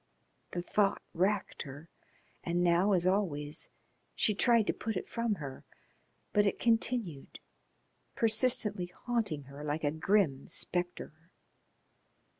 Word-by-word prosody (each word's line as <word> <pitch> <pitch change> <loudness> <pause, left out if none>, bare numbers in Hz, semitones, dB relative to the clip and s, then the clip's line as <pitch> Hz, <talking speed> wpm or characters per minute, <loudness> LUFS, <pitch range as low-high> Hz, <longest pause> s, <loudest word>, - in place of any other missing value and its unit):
The 175 - -4
thought 200 +1 +2
racked 195 +4 0
her, 145 +3 -8 0.6
and 175 0 0
now, 175 +4 +4
as 175 -2 +3
always, 160 -6 -1 0.5
she 215 - +2
tried 230 +1 +4
to - - +1
put 220 -3 -3
it - - -5
from 230 -2 -1
her, 140 -6 -7 0.7
but 205 0 +4
it 200 - 0
continued, 225 - 0 0.8
persistently 220 -4 +2
haunting 210 - -2
her 140 +2 -10
like 150 +1 -2
a 145 - +2
grim 160 -4 +1
spectre. 175 -2 -3
180 Hz, 120 wpm, -32 LUFS, 155-210 Hz, 0.8 s, now